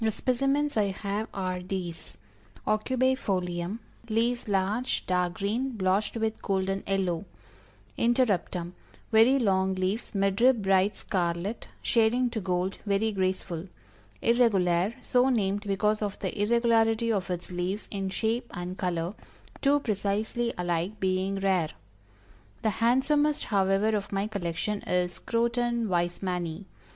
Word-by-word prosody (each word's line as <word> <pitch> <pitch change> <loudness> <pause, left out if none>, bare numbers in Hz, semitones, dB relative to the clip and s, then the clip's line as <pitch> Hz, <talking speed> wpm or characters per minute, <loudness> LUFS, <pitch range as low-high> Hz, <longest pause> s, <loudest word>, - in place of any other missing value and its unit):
The 220 - +3
specimens 275 +4 0
I 210 - +4
have 200 +2 -3
are 185 -2 -2
these: 175 - -5 0.5
Aucubæ 255 +5 +2
Folium 180 0 -1 0.3
leaves 235 +2 +1
large, 205 +5 0
dark 180 -1 0
green, 230 +7 -1
blotched 195 +4 +1
with 220 0 -2
golden 195 0 0
yellow. 190 -2 0 0.7
Interruptum, 205 -8 +1 0.4
very 230 +5 +6
long 190 -5 +2
leaves, 190 +5 -2
mid 195 +1 +1
rib 250 -4 +5
bright 195 +1 +3
scarlet, 180 +3 -2 0.2
shading 240 +2 +3
to 225 - -2
gold 185 0 -1
very 205 +2 +1
graceful. 185 -3 -2 0.6
Irregulare, 205 -4 +3
so 250 +1 +3
named 205 -3 0
because 210 +2 +1
of 205 -2 -2
the - - -4
irregularity 230 0 +3
of 190 -3 -2
its 175 0 -4
leaves 180 +4 -2
in 195 -2 -2
shape 230 +5 -1
and 180 +1 -5
color 175 0 -1 0.5
two 285 +1 +4
precisely 215 +2 -1
alike 175 +3 -1
being 190 +1 0
rare. 190 -5 +2 0.9
The 220 - +2
handsomest 290 +5 +3
however 200 +1 +2
of 200 -1 -3
my 195 0 0
collection, 200 0 -2
is 180 -1 -1
Croton 235 0 0
Weismanni. 175 0 -1
200 Hz, 125 wpm, -28 LUFS, 185-230 Hz, 0.9 s, very